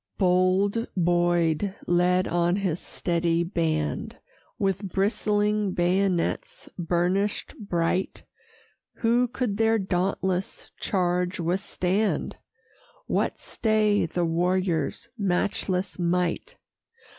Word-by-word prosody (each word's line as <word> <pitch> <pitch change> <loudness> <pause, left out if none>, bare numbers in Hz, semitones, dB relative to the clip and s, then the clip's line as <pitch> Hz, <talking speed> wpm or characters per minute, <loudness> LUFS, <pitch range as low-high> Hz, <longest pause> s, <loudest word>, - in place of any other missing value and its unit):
Bold 190 +4 +2
Boyd 175 +1 +2
led 180 +1 +2
on 175 +1 +1
his 185 -4 -1
steady 170 -1 0
band, 160 -4 -2 0.4
With 195 -2 -1
bristling 210 0 +1
bayonets 180 0 0
burnish'd 180 +4 0 0.2
bright: 170 +2 0 0.8
Who 240 +2 +3
could 240 -4 -2
their 225 0 +3
dauntless 190 -1 -2
charge 180 -1 0
withstand? 185 +1 -1 0.7
What - - 0
stay 215 -3 +1
the 175 +1 -1
warriors' 180 +4 0
matchless 185 -1 -1
might? 180 - 0
185 Hz, 85 wpm, -26 LUFS, 175-200 Hz, 0.8 s, Who